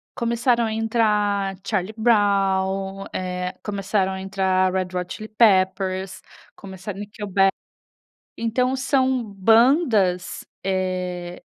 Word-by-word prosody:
Começaram 235 0 +1
a 220 - -2
entrar 210 -3 +1
Charlie 210 0 -2
Brown, 195 -3 +1
eh, 180 0 -3
começaram 195 -1 -1
a 190 0 -5
entrar 190 -1 +1
Red 185 -1 -1
Hot 180 0 -4
Chili 215 0 -9
Peppers, 190 -3 +2 0.3
começaram 190 0 -8
Nickelback. 200 -2 0 0.9
Então 250 +3 0
são 260 -2 +1
bandas, 220 - +3 0.2
eh, 180 -2 -3
195 Hz, 100 wpm, -22 LUFS, 185-220 Hz, 0.9 s, bandas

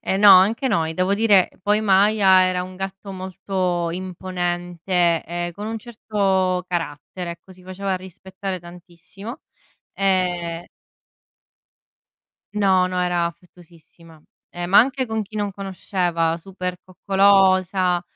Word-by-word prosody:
eh 190 - -1
no, 205 0 +7
anche 220 +8 +1
noi, 165 -9 0
devo 185 +3 +1
dire, 205 -3 +4
poi 210 +2 +2
Maya 195 -1 +5
era 185 -1 0
un 185 - -10
gatto 195 +1 -7
molto 185 -2 -2
imponente 175 -1 -1
e 175 +1 -4
con 205 +2 -6
un 225 +1 -4
certo 195 -6 -1
carattere, 170 +1 -5
ecco, 170 +2 -15
si 185 - -18
faceva 190 +1 -3
rispettare 190 +1 -7
tantissimo 180 +5 -11 0.5
e 180 -3 -1 1.9
No, 190 -3 +3
no, 185 0 -3
era 175 -1 +1
affettuosissima, 170 -1 -15 0.3
ehm, 175 0 -6
ma 200 - +7
anche 260 +2 +3
con 220 -2 -3
chi 215 +1 -8
non 205 -1 -1
conosceva, 180 -4 -1
super 180 0 -5
coccolosa, 185 -1 +2
185 Hz, 120 wpm, -22 LUFS, 175-195 Hz, 1.9 s, no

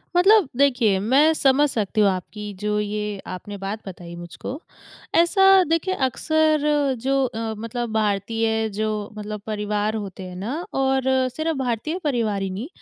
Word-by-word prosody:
मतलब 390 0 +6
देखिए 245 -8 +3
मैं 270 +10 +4
समझ 285 0 +3
सकती 215 -2 0
हूँ 200 - +5
आपकी 205 +3 -5
जो 210 0 0
ये 210 -1 -3
आपने 195 +3 -7
बात 195 +2 -4
बताई 170 -2 -8
मुझको। 175 - -7 0.6
ऐसा 385 +3 +6
देखिए 330 +3 0
अक्सर 315 +3 +2 0.4
जो 270 +1 +1
अ, 225 -2 -3
मतलब 230 +1 -4
भारतीय 220 +1 0
जो 215 +1 -1 0.3
मतलब 210 0 -6
परिवार 210 0 -1
होते 195 -3 -6
हैं 180 -1 -8
ना 205 +9 -4 0.2
और 265 -1 +1 0.3
सिर्फ़ 315 -1 -1
भारतीय 265 - -2
परिवार 230 -9 0
ही 195 - -2
नहीं 200 +9 -5
220 Hz, 150 wpm, -23 LUFS, 205-275 Hz, 0.6 s, मतलब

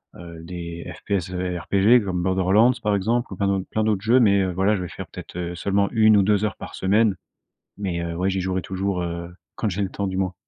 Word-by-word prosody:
heu, 85 -1 -10
des 85 -1 -7
FPS 95 -2 -3
RPG 95 +6 +2
comme 90 -3 -2
Borderlands, 95 +6 +4
par 105 -1 +2
exemple, 115 +5 0
ou - - -6
plein 100 - 0
d'autres 95 -1 0
plein 110 - 0
d'autres 105 -3 +1
jeux, 115 +5 +4
mais, 100 -5 +4
heu, 95 -1 0
voilà, 95 +4 +2
je 95 - -3
vais 90 - -5
faire - - -8
peut-être, - - -10
heu, 90 0 -4
seulement 100 +3 +1
1 110 -1 +5
ou 100 - +4
2 105 +1 +2
heures 105 - -3
par - - -9
semaine. 105 +2 +2 0.6
Mais, 95 -4 -3
heu, 85 0 -4
ouais, 95 +3 0
j'y 95 0 -1
jouerai 95 0 -1
toujours, 95 -1 -2
heu, 85 0 -5 0.2
quand 110 - -1
j'ai 100 +1 -2
le 95 - -2
temps, 100 - -3
du 95 -1 -3
moins. 95 -1 -1
95 Hz, 240 wpm, -23 LUFS, 90-105 Hz, 0.6 s, 1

